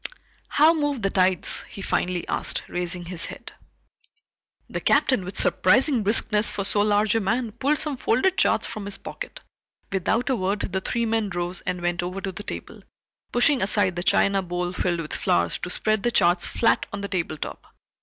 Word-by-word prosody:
"How 310 +3 +5
move 290 -7 -1
the 195 - +1
tides?" 185 -1 +2
he 195 - -9
finally 180 -2 -1
asked, - - +1
raising 175 0 -2
his 175 -1 -2
head. - - -9 1.1
The - - -5
Captain, 255 -8 +3
with 185 +1 -7
surprising 255 - +3
briskness 210 +1 +3
for 200 - -3
so 205 +1 +1
large 210 0 +2
a 225 - +2
man, 225 +3 -1
pulled 280 +7 0
some 290 -3 -2
folded 260 +11 +1
charts - - +2
from 215 -3 -6
his 200 -1 +2
pocket. - - -8 0.5
Without 215 +7 0
a - - +2
word 200 0 -1
the 190 0 -2
three 235 +4 -1
men 225 -2 0
rose 175 0 -3
and 180 -1 -2
went 175 0 0
over 180 +2 -4
to 195 0 -4
the 185 - -7
table, - - -8 0.5
pushing 255 +2 +4
aside 190 -2 +1
the 175 - -3
china 195 +2 +2
bowl 180 0 -3
filled 175 -2 -1
with 155 - -7
flowers 85 0 0
to 180 - -5
spread 215 +3 0
the 240 - +1
charts 175 -5 +2
flat 230 - +1
on 200 - -5
the 200 - -3
table 170 -5 -3
top. - - -7
200 Hz, 190 wpm, -24 LUFS, 180-225 Hz, 1.1 s, How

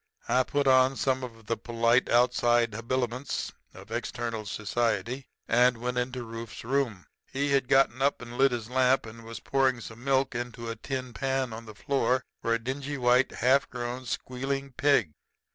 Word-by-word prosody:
"I 130 - +4
put 145 +2 0
on 130 0 +5
some 130 -1 0
of 115 -3 -9
the 115 - 0
polite 115 +2 +2
outside 120 -1 +3
habiliments 125 +3 -2 0.2
of - - -13
external 115 -3 -3
society 120 +5 -1 0.2
and 125 +1 +4
went 125 +1 -2
into 125 0 -3
Rufe's 115 -1 -8
room. 120 -6 -1 0.3
He 140 +1 0
had 135 -2 +2
gotten 135 -2 +3
up 140 +1 +2
and 120 0 -9
lit 135 +1 +4
his 115 -3 -3
lamp, 130 +1 +3
and 115 +1 -10
was 115 -1 -8
pouring 130 -2 +1
some 115 +1 -10
milk 135 -1 +2
into 120 -1 -4
a - - -5
tin 130 +1 -5
pan 135 -2 -1
on 115 +1 -8
the 110 - -10
floor 130 +1 +1 0.2
for 115 - -1
a 115 - +4
dingy 135 +4 -4
white, 125 0 +3
half 130 +4 +2
grown, 125 +1 -5
squealing 135 +3 -3
pig. 130 - +2
125 Hz, 175 wpm, -28 LUFS, 115-135 Hz, 0.3 s, on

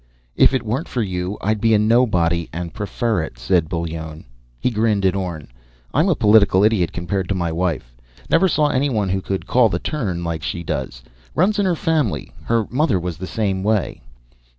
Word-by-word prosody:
"If - - +5
it 130 - -1
weren't 120 +9 -2
for 120 - -1
you, 90 0 -3
I'd 105 0 0
be 115 -1 +4
a - - +5
nobody 105 -7 +2
and 85 +1 -5
prefer 110 -1 -1
it," 80 -5 -7
said 80 +7 +1
Bullone. 80 -2 -5 0.3
He 125 - 0
grinned 105 -3 +1
at 95 - +2
Orne. 85 -8 -4 0.4
"I'm 160 +7 +3
a 170 - +3
political 105 -4 +5
idiot 105 -6 +2
compared 90 +1 -3
to 100 - 0
my 85 -2 -1
wife. 80 -8 -2 0.3
Never 190 +3 +4
saw 150 -4 +2
anyone 130 -8 0
who 95 +1 0
could 95 0 -3
call 125 -3 +4
the 85 - -1
turn 95 - -3
like 85 -2 -3
she 85 +3 -4
does. - - -4 0.3
Runs 205 +5 +2
in 200 - +2
her 175 - +2
family. 150 - -1
Her 115 -2 +1
mother 130 - +2
was 85 -2 -4
the 95 - -6
same 100 -3 -1
way." 105 -1 0
100 Hz, 195 wpm, -20 LUFS, 85-115 Hz, 0.4 s, If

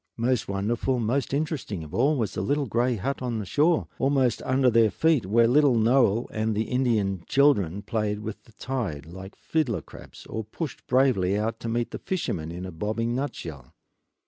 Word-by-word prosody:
Most 120 0 0
wonderful, 115 +6 -1
most 120 +5 0
interesting 140 - -2
of 75 +1 -11
all 140 +9 +2
was 110 -5 -1
the - - -2
little 145 0 0
gray 120 +1 +1
hut 130 +7 -3
on 120 -3 -2
the 105 - -4
shore, 155 - +2
almost 135 -2 +2
under 130 -1 +2
their 115 -1 +5
feet, 155 - +2
where 115 +3 +4
little 140 +1 +4
Noel 115 -1 +3
and 110 -1 -1
the 110 - +1
Indian 110 -8 +1
children 100 - +3
played 105 -1 -2
with 110 -1 -7
the 115 - -20
tide 105 - -4
like 95 +4 -10
fiddler 150 -9 -1
crabs, - - -13
or 110 - -4
pushed 140 +8 -7
bravely 115 -8 +3
out 110 +2 -2
to 115 - -4
meet 120 +1 -1
the - - -5
fishermen 85 - -3
in 90 +2 -6
a 95 - -6
bobbing 110 +7 -2
nutshell. 80 - -5
115 Hz, 185 wpm, -26 LUFS, 100-130 Hz, -, their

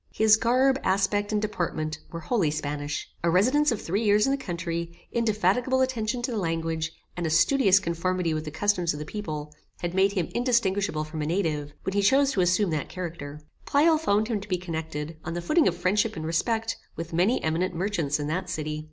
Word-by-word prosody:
His 220 -1 +6
garb, 255 +4 +3
aspect, 200 +2 +1
and 210 - +1
deportment, 160 -6 -2
were 165 - -6
wholly 190 -4 +1
Spanish. 150 -1 -3 0.2
A 170 - +3
residence 255 - +3
of 225 - -1
three 200 +7 -1
years 210 0 +4
in 270 - +1
the - - +3
country, 170 -7 -5
indefatigable 230 +3 +1
attention 240 -2 -1
to 250 - -1
the 225 - -1
language, 165 -2 -2 0.2
and 175 -2 -2
a - - -1
studious 195 - +4
conformity 175 -1 -1
with 155 0 -2
the - - -4
customs 175 0 +1
of 150 - -6
the 150 - -5
people, 150 -6 -5 0.3
had 175 -1 -2
made 195 +1 +3
him 180 -5 -1
indistinguishable 205 -9 +1
from 155 0 -6
a 150 - -2
native, 155 -5 -1
when 190 - -2
he 200 - +2
chose 270 +7 +4
to 195 - +1
assume 180 +1 +2
that 150 -3 -2
character. 160 -5 -6 0.3
Pleyel 310 +2 +4
found 215 -8 +1
him 220 -4 -1
to 205 - -10
be 180 - +1
connected, 160 -3 -5
on 170 - -4
the - - -1
footing 305 - +3
of 175 - 0
friendship 205 +5 +1
and 160 -1 -5
respect, 225 +8 0 0.2
with 165 0 -6
many 185 +9 +2
eminent 170 +3 0
merchants 165 -6 -1
in 145 - -2
that 180 +4 -2
city. 155 -1 -3
185 Hz, 205 wpm, -26 LUFS, 160-215 Hz, 0.3 s, His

